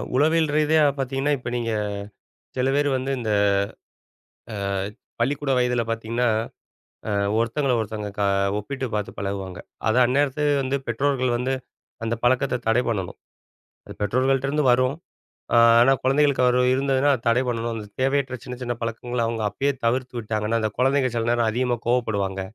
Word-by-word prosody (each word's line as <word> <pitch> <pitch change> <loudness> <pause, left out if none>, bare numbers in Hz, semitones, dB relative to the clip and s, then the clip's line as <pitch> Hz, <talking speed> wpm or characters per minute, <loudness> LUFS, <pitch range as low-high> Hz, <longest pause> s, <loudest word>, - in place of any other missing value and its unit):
உளவியல் 155 +2 +3
ரீதியா 155 0 +4 0.2
பாத்தீங்கன்னா 135 +2 -1
இப்ப 120 -1 -6
நீங்க 115 -1 -1 0.9
சில 130 +1 +1
பேர் 145 0 +2
வந்து 130 +1 -3
இந்த 110 -3 -3 1.2
அ, - - -4 0.7
பள்ளிக்கூட 135 +3 0
வயதில 125 -1 +1
பாத்தீங்ன்னா 115 +2 -1 0.8
அ - - -1 0.3
ஒருத்தங்கள 125 +4 0
ஒருத்தங்க 105 -1 -4
க - - +1 0.4
ஒப்பிட்டு 130 +4 -4
பாத்து 105 -1 -2
பழகுவாங்க. 95 -2 -4 0.3
அத 110 - +2
அந்நேரத்துல 140 +3 +1 0.2
வந்து 130 +1 -1
பெற்றோர்கள் 130 +1 0
வந்து 130 +2 -1 0.5
அந்த 115 +1 0
பழக்கத்த 125 0 +2
தடை 120 +3 +3
பண்ணணும். 95 -6 -3 0.7
அது - - -9
பெற்றோர்கள்ட்டருந்து 135 +6 +1
வரும். 130 +3 +2 0.6
அ, - - +6 0.2
ஆனா 135 +3 +6
குழந்தைகளுக்கு 135 -1 +3
வரும் 125 0 +3
இருந்ததுனா, 135 +1 +2
அத 115 - -6
தடை 120 +3 +3
பண்ணணும். 115 -1 -2
அந்த 105 -1 -6 0.2
தேவையற்ற 135 -1 0
சின்ன 125 0 -7
சின்ன 120 -1 -2
பழக்கங்கள 115 +1 -2
அவுங்க 115 -1 -2
அப்பயே 140 +6 0
தவிர்த்து 125 +1 -1
விட்டாங்கன்னா, 110 +1 -1
அந்த 110 - 0
குழந்தைங்க 135 0 +2
சில 115 0 0
நேரம் 120 -1 +2
அதிகமாக 120 0 -1
கோவப்படுவாங்க. 100 -6 0
125 Hz, 145 wpm, -23 LUFS, 115-135 Hz, 1.2 s, அ